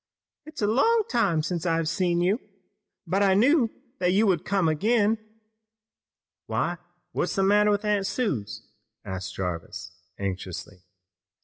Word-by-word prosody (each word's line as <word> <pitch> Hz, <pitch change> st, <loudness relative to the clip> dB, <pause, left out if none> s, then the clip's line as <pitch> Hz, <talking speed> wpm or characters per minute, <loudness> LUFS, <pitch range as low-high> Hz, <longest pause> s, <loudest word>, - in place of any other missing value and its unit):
It 310 Hz, -, -11 dB
is -, -, -4 dB
a -, -, +3 dB
long 440 Hz, -, +3 dB
time 195 Hz, -10 st, +2 dB
since 170 Hz, 0 st, -2 dB
I've 165 Hz, -2 st, +1 dB
seen 175 Hz, -1 st, +1 dB
you, 195 Hz, +6 st, +2 dB, 0.7 s
but 195 Hz, +2 st, 0 dB
I 195 Hz, -2 st, +4 dB
knew 250 Hz, +3 st, +4 dB, 0.3 s
that 180 Hz, 0 st, +2 dB
you 210 Hz, +3 st, +4 dB
would 180 Hz, -6 st, +2 dB
come 195 Hz, -4 st, +1 dB
again!" 215 Hz, +7 st, +2 dB, 1.3 s
"Why, 175 Hz, -1 st, -1 dB, 0.3 s
what's 175 Hz, -, -1 dB
the 195 Hz, -, +2 dB
matter, 205 Hz, +1 st, +4 dB
Aunt 205 Hz, -2 st, +1 dB
Suse?" 200 Hz, -, -3 dB, 0.4 s
asked 95 Hz, -1 st, -5 dB
Jarvis 90 Hz, 0 st, -5 dB, 0.3 s
anxiously. 95 Hz, -1 st, -5 dB
190 Hz, 135 wpm, -26 LUFS, 155-210 Hz, 1.3 s, I